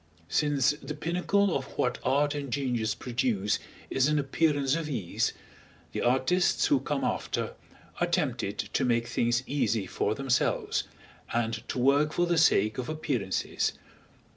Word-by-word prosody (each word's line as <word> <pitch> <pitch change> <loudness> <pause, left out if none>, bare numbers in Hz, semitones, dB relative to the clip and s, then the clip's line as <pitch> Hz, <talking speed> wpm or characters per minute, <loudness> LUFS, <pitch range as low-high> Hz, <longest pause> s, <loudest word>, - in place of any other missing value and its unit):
Since 145 - +2
the 150 - -5
pinnacle 180 +5 +1
of 135 - -1
what 125 - 0
art 145 +3 +2
and 140 -3 -4
genius 120 -5 0
produce 115 -5 0 0.3
is 135 0 +3
an 150 0 +2
appearance 145 -1 +1
of 165 -2 -3
ease, 110 -11 -1 0.6
the - - -3
artists 130 +9 +2
who - - +3
come - - -2
after - - -2 0.5
are - - +2
tempted - - -1
to - - -1
make 120 -1 +2
things 120 +1 +1
easy 115 -8 0
for 105 +3 -1
themselves, 135 -1 0 0.5
and 115 -1 0
to - - -4
work 140 +4 +3
for 175 - +2
the 170 -1 +2
sake 110 -8 +3
of 125 - -4
appearances. 140 - -1
135 Hz, 145 wpm, -28 LUFS, 120-150 Hz, 0.6 s, is